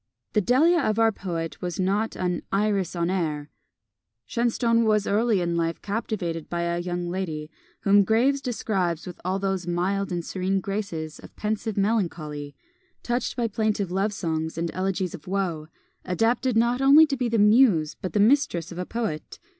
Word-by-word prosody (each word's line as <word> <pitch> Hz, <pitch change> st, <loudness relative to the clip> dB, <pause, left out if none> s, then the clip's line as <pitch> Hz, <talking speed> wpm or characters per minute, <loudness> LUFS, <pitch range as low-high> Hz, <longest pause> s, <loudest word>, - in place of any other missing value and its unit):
The 210 Hz, -, +3 dB
Delia 310 Hz, -, +4 dB
of 215 Hz, 0 st, 0 dB
our 225 Hz, 0 st, +4 dB
poet 170 Hz, -5 st, -5 dB
was 175 Hz, -1 st, -4 dB
not 200 Hz, +4 st, 0 dB
an 180 Hz, -1 st, -1 dB
"Iris 195 Hz, -3 st, 0 dB
en 170 Hz, +1 st, 0 dB
air." 155 Hz, -5 st, -2 dB, 0.7 s
Shenstone 230 Hz, -, +1 dB
was 215 Hz, -2 st, +2 dB
early 215 Hz, -1 st, +2 dB
in 170 Hz, -1 st, -1 dB
life 165 Hz, -1 st, -1 dB
captivated 195 Hz, -6 st, -3 dB
by 170 Hz, 0 st, -2 dB
a 170 Hz, 0 st, -1 dB
young 175 Hz, 0 st, -3 dB
lady, 160 Hz, -5 st, -4 dB, 0.3 s
whom 200 Hz, 0 st, +5 dB
Graves 245 Hz, +7 st, +2 dB
describes 190 Hz, -, -1 dB
with 180 Hz, -, -9 dB
all 185 Hz, +2 st, 0 dB
those 190 Hz, -2 st, -2 dB
mild 190 Hz, +3 st, -1 dB
and 175 Hz, -1 st, -2 dB
serene 190 Hz, +1 st, -1 dB
graces 185 Hz, -6 st, -4 dB
of -, -, -14 dB
pensive 215 Hz, 0 st, -2 dB
melancholy, 165 Hz, -9 st, -1 dB, 0.5 s
touched 240 Hz, 0 st, -1 dB
by 240 Hz, -2 st, 0 dB
plaintive 210 Hz, -3 st, -1 dB
love 195 Hz, +3 st, 0 dB
songs 160 Hz, -4 st, -3 dB
and 170 Hz, 0 st, -1 dB
elegies 185 Hz, -1 st, -1 dB
of 170 Hz, -3 st, -10 dB
woe, 180 Hz, -5 st, -2 dB, 0.4 s
adapted 225 Hz, +6 st, +1 dB
not 240 Hz, +3 st, +2 dB
only 285 Hz, +4 st, +8 dB
to 290 Hz, -3 st, -2 dB
be 245 Hz, -2 st, -1 dB
the 230 Hz, -, +1 dB
muse 210 Hz, -, +4 dB
but 185 Hz, -, -4 dB
the 210 Hz, -, +2 dB
mistress 205 Hz, -, +2 dB
of 175 Hz, -, -7 dB
a 180 Hz, -, -3 dB
poet. 220 Hz, -10 st, -4 dB
195 Hz, 170 wpm, -25 LUFS, 170-220 Hz, 0.7 s, only